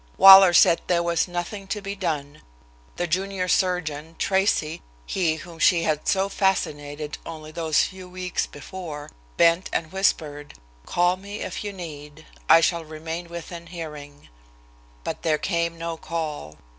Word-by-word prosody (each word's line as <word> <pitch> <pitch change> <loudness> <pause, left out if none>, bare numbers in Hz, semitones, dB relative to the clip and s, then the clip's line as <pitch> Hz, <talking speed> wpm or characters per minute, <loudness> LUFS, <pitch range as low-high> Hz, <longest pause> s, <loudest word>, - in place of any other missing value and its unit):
Waller 195 -1 +10
said 170 -1 +5
there 170 -1 +2
was 170 +1 +1
nothing 180 +3 -5
to 210 - -3
be 200 0 -5
done. 150 -6 -3 0.5
The 175 - -1
junior 185 +2 -1
surgeon, 165 -4 0
Tracy, 190 -5 +1 0.2
he 170 -4 0
whom 165 +1 -11
she 170 +1 +4
had 155 -2 -1
so 195 0 +2
fascinated 150 -7 -2
only 155 -1 -8
those 160 -1 +1
few 185 -1 -7
weeks 180 -1 -3
before, 150 -1 -8 0.3
bent 170 +4 +4
and 160 -1 -2
whispered: 150 -6 -1 0.3
"Call 175 +1 +2
me 200 +2 -8
if 185 - -5
you 205 - -4
need. 155 -4 -9 0.2
I 165 - +8
shall 170 0 +1
remain 160 +2 -6
within 170 0 -8
hearing." 150 -4 -9 0.8
But - - -4
there 155 -2 +1
came 170 -1 -1
no 165 0 -4
call. 155 - -5
170 Hz, 145 wpm, -24 LUFS, 155-185 Hz, 0.8 s, Waller